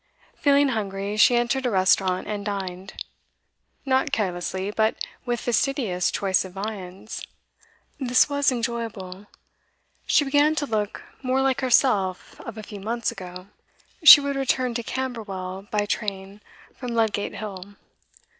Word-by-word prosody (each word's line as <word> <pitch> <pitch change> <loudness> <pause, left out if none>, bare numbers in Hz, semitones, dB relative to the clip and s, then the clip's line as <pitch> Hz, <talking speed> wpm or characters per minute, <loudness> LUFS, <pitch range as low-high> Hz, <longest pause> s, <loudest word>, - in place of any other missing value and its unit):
Feeling 285 -1 +3
hungry, 200 -3 -3
she 225 +3 +5
entered 240 +2 +1
a - - +1
restaurant, 185 -2 +2
and 205 -1 -4
dined. 195 -2 -5 0.9
Not 265 +1 +1
carelessly, 190 -3 -2
but 220 +1 +1 0.3
with 240 -1 -1
fastidious 240 -7 0
choice 195 -2 +1
of 185 -1 -10
viands. 195 0 -6 0.8
This 250 -2 +4
was 285 -1 +2
enjoyable; 225 -5 -4 0.8
she 295 - +4
began 290 +3 +3
to 300 - -1
look 210 -5 -2 0.2
more 260 0 0
like 270 0 +1
herself 215 -8 +1
of 230 -1 -8
a 215 - -7
few 205 -1 -9
months 230 +3 -2
ago. 180 +1 -9 0.5
She 305 - +12
would 280 0 -2
return 255 -2 0
to 235 - -2
Camberwell 205 -7 -5
by 210 -1 0
train 200 -1 -4 0.3
from 245 -3 -5
Ludgate 220 -3 0
Hill. 200 -1 -8
215 Hz, 135 wpm, -24 LUFS, 195-255 Hz, 0.9 s, She